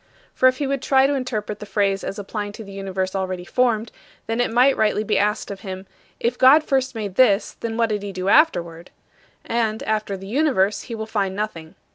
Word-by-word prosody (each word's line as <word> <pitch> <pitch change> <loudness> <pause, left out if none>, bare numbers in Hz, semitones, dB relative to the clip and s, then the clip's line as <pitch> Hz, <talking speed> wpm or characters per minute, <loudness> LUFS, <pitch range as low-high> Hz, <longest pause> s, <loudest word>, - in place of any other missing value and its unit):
For 255 - +4
if 255 - -4
he 285 - -1
would 275 -1 -1
try 265 0 +4
to 280 - +2
interpret 220 -6 -3
the - - -7
phrase 195 -2 0
as 195 - -5
applying 205 0 -5
to 220 - -9
the 200 - -11
universe 190 -1 -3
already 185 -2 -3
formed, 235 0 +1
it - - -33 0.5
then 245 - +1
might 255 +4 +4
rightly 215 0 +1
be 210 - +1
asked 210 0 0
of 195 - -7
him, 190 -1 -7 0.3
"If 235 +1 -1
God 280 +4 +7
first 260 -3 0
made 210 -4 -4
this, 220 -5 +3
what 225 -1 -3
then 230 -1 +2
did 210 -2 -2
he 200 0 -5
do 185 0 -4
afterward?" 175 - +2 0.6
And, 225 -2 -1
after 215 -2 -2
the 190 - -10
universe, 210 -4 +1
he 230 - -4
will 220 0 -5
find 200 -3 -2
nothing. 170 -6 -5
215 Hz, 215 wpm, -22 LUFS, 195-245 Hz, 0.6 s, God